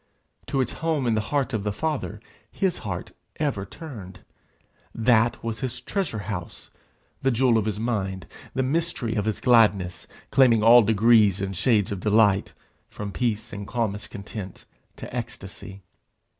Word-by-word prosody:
To 135 - +1
its 125 - -1
home 160 -5 0
in 115 - +2
the 110 - +1
heart 140 -3 0
of 110 - 0
the 105 +1 -1
Father 140 -3 -3 0.3
his 190 -3 -1
heart 90 -4 -5 0.2
ever 130 -10 -2
turned. 100 - -10 0.7
That 115 0 +2
was 115 -1 -3
his 130 -2 -4
treasure 190 - -2
house, 90 -4 -6 0.5
the 135 - +2
jewel 125 -1 +3
of 110 -2 +2
his 105 -1 -2
mind, 95 -6 -2 0.3
the 130 - +1
mystery 140 -4 -1
of 105 -2 -1
his 110 -2 -1
gladness, 105 -7 +3 0.2
claiming 120 -5 +5
all 120 +2 +9
degrees 110 -2 +4
and 95 0 -3
shades 105 +1 +2
of 100 - -3
delight, 105 -1 +3 0.4
from 105 -1 -6
peace 115 0 -2
and 100 -1 -6
calmest 110 -4 -2
content 100 -2 -8 0.3
to - - -8
ecstasy. 100 -4 -7
110 Hz, 155 wpm, -25 LUFS, 100-125 Hz, 0.7 s, all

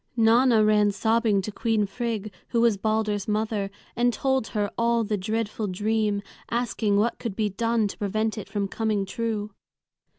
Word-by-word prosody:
Nanna 230 0 +5
ran 210 -1 +4
sobbing 220 -1 +2
to 215 - -4
Queen 225 -1 +1
Frigg, 215 -1 -4
who 235 - +1
was 235 -3 +4
Balder's 215 -1 -1
mother, 210 -1 -1 0.3
and 245 +1 +3
told 265 0 0
her 205 -3 -2
all 235 0 +2
the 210 0 -1
dreadful 215 +2 -2
dream, 210 +1 0 0.3
asking 225 -3 0
what 225 +3 +1
could 225 -5 -4
be 215 -1 0
done 230 +2 +1
to - - -8
prevent 215 +2 -1
it 215 - -7
from 200 -2 -1
coming 215 -1 -1
true. 215 -1 -3
215 Hz, 165 wpm, -25 LUFS, 205-230 Hz, 0.3 s, Nanna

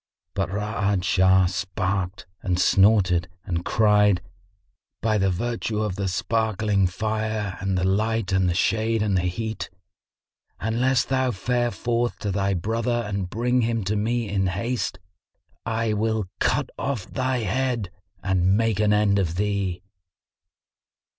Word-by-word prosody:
But 95 -2 -1
Ra'ad 105 -1 -1
Shah 95 0 +4
snarked 95 0 -2 0.2
and 90 -2 0
snorted 95 -4 +4 0.2
and 85 -1 -2
cried, 105 -4 +3 0.8
"By 110 -1 +1
the 95 0 +2
virtue 110 +2 -2
of 105 -4 -2
the 100 0 -2
sparkling 105 +1 +1
Fire 110 +1 -2
and 95 0 -1
the 90 - 0
light 105 +2 0
and 95 -1 +2
the 85 - 0
shade 110 +3 +1
and 100 -2 +1
the 90 - +2
heat, 110 +4 -3 0.9
unless 120 +4 +1
thou 130 -1 +1
fare 120 +3 0
forth 120 0 -1
to 105 - -3
thy 100 0 0
brother 115 +6 -1
and 100 -3 -3
bring 125 +5 +1
him 115 -1 0
to 100 +3 -1
me 115 +2 0
in 95 -1 0
haste, 100 +3 -2 0.7
I 115 -1 0
will 110 0 0
cut - - +1
off 130 -8 -2
thy 130 -1 -1
head 120 -3 -1 0.3
and 95 0 +2
make 115 -3 +1
an 105 -1 +3
end 105 -1 +3
of 85 -4 -1
thee." 100 -2 -1
105 Hz, 140 wpm, -24 LUFS, 95-115 Hz, 0.9 s, Shah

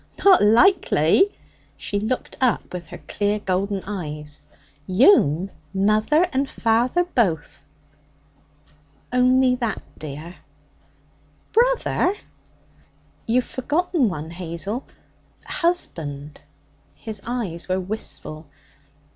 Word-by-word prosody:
Not 385 -2 +7
likely!' 375 - +4 0.5
She 205 - -2
looked 220 +5 -3
up 250 -7 +1
with 175 -2 -6
her - - -9
clear 205 0 -1
golden 195 0 -2
eyes. 150 -7 -6 0.5
'You'm 190 - +4 0.2
mother 215 - +3
and 270 +1 0
father 240 +9 +1
both!' 185 - -1 1.5
'Only 255 +1 +4
that, 235 -3 -3 0.2
dear?' 155 +4 -8 1.2
'Brother.' 475 -5 +2 1.1
'You've 245 +2 +2
forgotten 295 - 0
one, 160 -2 -6
Hazel 180 +7 -5 0.6
husband.' 150 - -2 0.5
His 215 -3 -6
eyes 215 -9 -3
were 185 +1 +1
wistful. 180 -5 -6
210 Hz, 90 wpm, -22 LUFS, 170-260 Hz, 1.5 s, Not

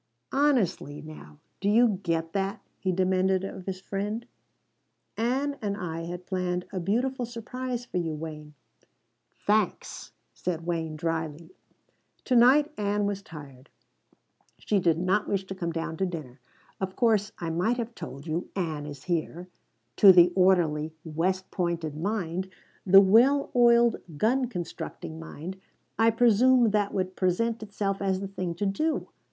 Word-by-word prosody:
"Honestly 245 - +1
now, 150 - -11 0.2
do 200 - 0
you 220 -2 +4
get 165 -3 -2
that?" 195 0 -1 0.2
he 190 - 0
demanded 185 +1 +1
of 190 -1 -7
his 185 -1 -3
friend. 205 +4 -4 0.9
"Ann 270 +5 -1
and 200 -2 -2
I 165 -3 -4
had 175 +1 -7
planned 180 -1 -2
a 190 - -2
beautiful 245 +8 0
surprise 245 +1 -5
for 210 - -4
you, 165 -3 -1
Wayne." 150 -1 -8 0.9
"Thanks," 210 -1 0 0.2
said 170 -2 -4
Wayne 165 -2 -2
drily. 160 +1 -3 0.7
"To 255 - +1
night 280 +6 +5
Ann 205 0 0
was 200 -1 -2
tired. 145 -8 -12 0.9
She 205 - 0
did 170 -3 +2
not 185 +4 +1
wish 195 -1 -1
to 195 - -6
come 175 -3 -3
down 165 0 -4
to 190 - 0
dinner. 150 -7 -7 0.4
Of 190 -1 -3
course, 215 -4 +2
I 165 -1 -3
might 185 +9 +1
have 235 -1 -4
told 140 - -8
you: 165 +2 -3
'Ann 160 -6 -3
is 145 -2 -9
here.' 175 +1 -3 0.5
To 200 - +10
the 175 -1 +6
orderly, 165 -5 +2
West 180 +4 -2
Pointed 170 -4 -2
mind, 185 0 -2 0.4
the 195 +1 +9
well 240 +9 +4
oiled, 235 -1 +5 0.2
gun 250 - +2
constructing 170 - -6
mind, 150 - -7 0.4
I 225 0 +6
presume 240 +1 +4
that 205 -1 +1
would 185 -1 -2
present 220 +5 0
itself 200 -2 -3
as 190 -1 0
the 195 - -4
thing 185 -3 -4
to 205 - -2
do. 305 +12 -1
190 Hz, 150 wpm, -27 LUFS, 165-220 Hz, 0.9 s, To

